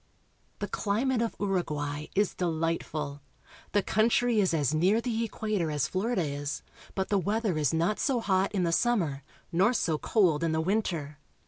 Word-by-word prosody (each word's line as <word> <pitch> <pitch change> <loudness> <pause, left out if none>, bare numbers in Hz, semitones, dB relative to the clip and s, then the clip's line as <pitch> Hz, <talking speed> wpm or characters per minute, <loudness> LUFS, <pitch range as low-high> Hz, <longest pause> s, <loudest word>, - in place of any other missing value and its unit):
The - - -3
climate 230 +4 0
of 230 - -1
Uruguay 150 -7 -2
is 205 0 +2
delight 165 -1 -1
ful. 145 -2 -5 0.5
The 205 - +3
country 230 +2 +2
is 190 -3 +3
as 150 -3 +1
near 185 +8 +3
the 230 -1 -1
equa 215 -1 -2
tor 165 -2 0
as 145 -6 0
Florida 195 - 0
is, 145 0 -4 0.3
but 190 -1 -1
the 200 - +3
weather 210 0 0
is 150 -3 +1
not 170 +6 +1
so 265 -4 +1
hot 195 -3 +1
in 195 -3 0
the 170 - +1
summer, 170 - +1 0.3
nor 190 +7 +3
so 160 -9 0
cold 170 -8 +2
in 165 -1 +1
the 160 - +1
winter. 165 -6 -1
185 Hz, 180 wpm, -29 LUFS, 155-215 Hz, 0.5 s, The